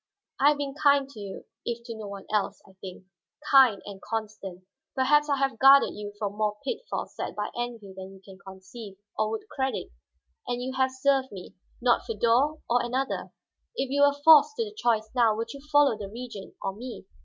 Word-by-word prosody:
"I 285 - +6
have 295 - +2
been 280 -1 -3
kind 280 -2 +4
to 235 - -12
you, 200 -2 -8 0.2
if 235 0 -4
to 230 -1 -6
no 215 -2 -7
one 200 -1 -8
else, 205 -1 0
I 190 - -18
think. 185 -1 -9 0.5
Kind, 260 -7 +6
and 200 -1 -9
constant. 210 -4 -5 0.3
Perhaps 295 +3 +3
I 280 - +2
have 270 -4 -1
guarded 275 +1 +7
you 205 0 -7
from 205 -1 -4
more 210 -1 0
pitfalls - - -4
set - - -5
by 210 0 -3
envy 235 -5 -5
than 190 0 -9
you - - -15
can 195 -1 -13
conceive, 195 +2 -11 0.2
or 215 - 0
would 220 0 -5
credit. 265 0 -3 0.6
And 245 0 -2
you 255 +1 -4
have 260 0 +2
served 265 0 +1
me, 190 -3 -10 0.3
not 240 -1 +4
Feodor 240 +8 +1
or 245 +1 +2
another. 260 +3 -2 0.4
If 265 0 -2
you 285 +1 +1
were 285 0 +4
forced 320 +7 +8
to 460 - 0
the 420 - -9
choice 225 - +1
now, 235 -4 +3
would 230 +1 -4
you 280 - -10
follow 290 -5 +5
the 205 -2 -7
Regent 230 -3 -9
or 195 - -2
me?" 240 -1 -8
235 Hz, 200 wpm, -27 LUFS, 205-270 Hz, 0.6 s, forced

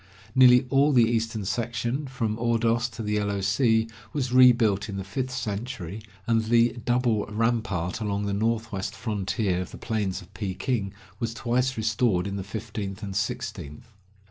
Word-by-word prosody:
Nearly 125 0 +7
all 140 +2 +4
the 120 -3 +6
eastern 115 -2 -1
section, 120 +6 -2
from 115 -4 -2
Ordos 115 +1 +1
to 110 - -6
the 105 0 -1
Yellow 100 -1 0
Sea, 110 +3 +2 0.3
was 130 -4 -2
rebuilt 120 -5 +5
in 100 - -4
the 95 - -3
fifth 125 +7 -3
century, 110 -5 -4 0.2
and 115 -1 +2
the 115 +1 +3
double 120 -3 +1
rampart 110 -4 -1
along 100 -1 -1
the 100 - -1
northwest 110 -2 -1
frontier 100 -4 -1
of 90 - -6
the - - -10
plains 105 -4 -2
of 95 +2 -15
Peking 100 +2 -2 0.3
was 115 0 -2
twice 125 +2 0
restored 110 -4 +1
in 100 0 -3
the 100 - -3
fifteenth 105 -1 -6
and 100 -2 -5
sixteenth. 100 - -4
110 Hz, 160 wpm, -26 LUFS, 100-120 Hz, 0.3 s, Nearly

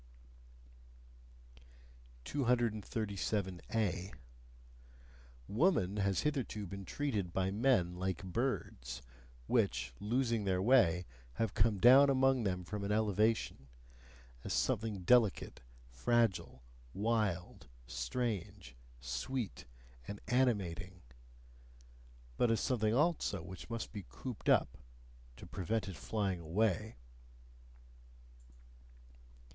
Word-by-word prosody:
237A. 105 -5 -1 1.4
Woman 105 - +2
has 100 -3 +1
hitherto 130 -8 -2
been 95 +1 -7
treated 105 -11 -2
by 95 +2 0
men 105 -5 +2
like 95 -1 -3
birds, 90 - -3 0.4
which, 65 +1 +1
losing 115 +1 0
their 95 -2 +1
way, 95 -6 +4 0.3
have 110 - -1
come 105 0 +2
down 130 +7 +8
among 135 -1 +3
them 90 -3 -1
from 100 +3 -5
an 100 - -2
elevation: 105 -8 +1 0.8
as - - -3
something 105 -3 0
delicate, 115 0 +3 0.3
fragile, 95 - +1 0.3
wild, 105 -5 -1 0.2
strange, 65 - -3 0.2
sweet, 70 - -4 0.4
and 100 0 -6
animating 100 -8 0 1.3
but 120 - +3
as 115 -2 +2
something 110 -2 +1
also 150 - +1
which 95 +4 -9
must 115 -1 -4
be 105 -3 -6
cooped - - -5
up - - +3 0.6
to - - -10
prevent 100 +2 -2
it 95 - -6
flying 100 0 -2
away. 105 +6 0
105 Hz, 90 wpm, -35 LUFS, 90-115 Hz, 1.4 s, down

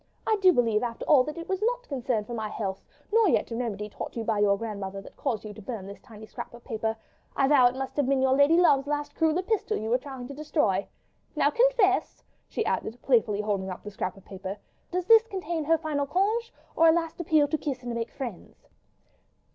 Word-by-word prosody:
I 440 - +3
do 375 -1 +7
believe, 230 -7 +2
after 235 -2 -4
all, 280 -4 +6
that 305 +2 -6
it 335 - -7
was 380 +1 -2
not - - -1
concern 250 -5 -1
for 240 - -7
my 220 -2 -3
health, 195 -3 -4 0.3
nor 450 -3 +5
yet - - +1
a - - -2
remedy 215 -4 -3
taught 210 - -7
you 230 - -2
by 220 -2 0
your 200 -1 +3
grandmother 200 -3 -5
that 195 - -13
caused 235 -7 -2
you 210 - -7
to 215 - -11
burn 215 -3 -6
this 200 +1 -9
tiny 220 -2 -12
scrap 225 - -8
of 240 - -15
paper.... 220 -2 -2 0.4
I 270 - +3
vow 270 -4 +6
it 245 - -2
must 265 0 -5
have 285 -3 +2
been 275 0 +2
your 260 0 +3
lady 285 +4 +5
love's 285 -6 +4
last 295 0 -2
cruel 320 0 +2
epistle 425 +3 -1
you 220 +1 -3
were 250 - +3
trying 265 -2 -8
to 280 - -8
destroy. 280 - 0 0.5
Now - - +3
confess!" 475 -6 +2 0.3
she - - -2
added, 230 +3 -2
playfully 225 -5 +2
holding 200 -2 -2
up 185 - -7
the 210 - -7
scrap 185 -1 -4
of 195 - -17
paper, 190 +1 -6 0.3
"does 360 0 -2
this 450 +1 +6
contain 345 -6 -3
her 325 +2 +4
final 300 -3 -2
congé, 430 +8 +1 0.3
or 330 - +5
a - - +8
last 330 0 -1
appeal 310 -3 +3
to 315 - 0
kiss 265 -4 -4
and 240 -1 -4
make 235 0 -3
friends?" 240 -10 -8
260 Hz, 230 wpm, -27 LUFS, 215-325 Hz, 0.5 s, a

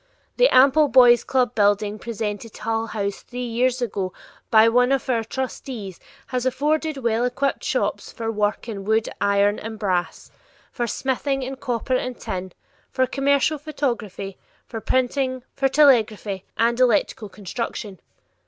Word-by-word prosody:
The - - +5
ample 280 +4 +5
Boys' 245 -3 +6
club 255 -2 +1
building 205 0 +1
presented 220 -1 -5
to - - -12
Hull 225 0 -1
House 200 -2 -3
three 250 0 -6
years 245 +2 0
ago 195 -5 -3 0.4
by 220 0 +6
one 245 +2 +3
of 270 -3 0
our 230 -2 +1
trustees 230 -5 -6 0.3
has 250 -2 -3
afforded 300 +4 0
well 235 -2 0
equipped 265 +3 -1
shops - - -1
for 225 -1 -4
work 210 +1 -1
in 205 -4 -5
wood, 220 +2 +1
iron, 200 +1 +2
and 220 0 -7
brass; 185 -4 -2 0.4
for 240 -1 -2
smithing 270 +3 -1
in 265 +1 -5
copper 250 0 -2
and 255 -1 -2
tin; 185 0 -5 0.4
for 260 -1 +1
commercial 280 +3 +1
photography, 235 - -4 0.3
for 225 -2 -7
printing, 255 +1 0
for 270 -1 +1
telegraphy, 220 -9 +3
and 235 +1 +2
electrical 235 -3 +2
construction. 205 -1 -6
235 Hz, 145 wpm, -23 LUFS, 210-260 Hz, 0.4 s, Boys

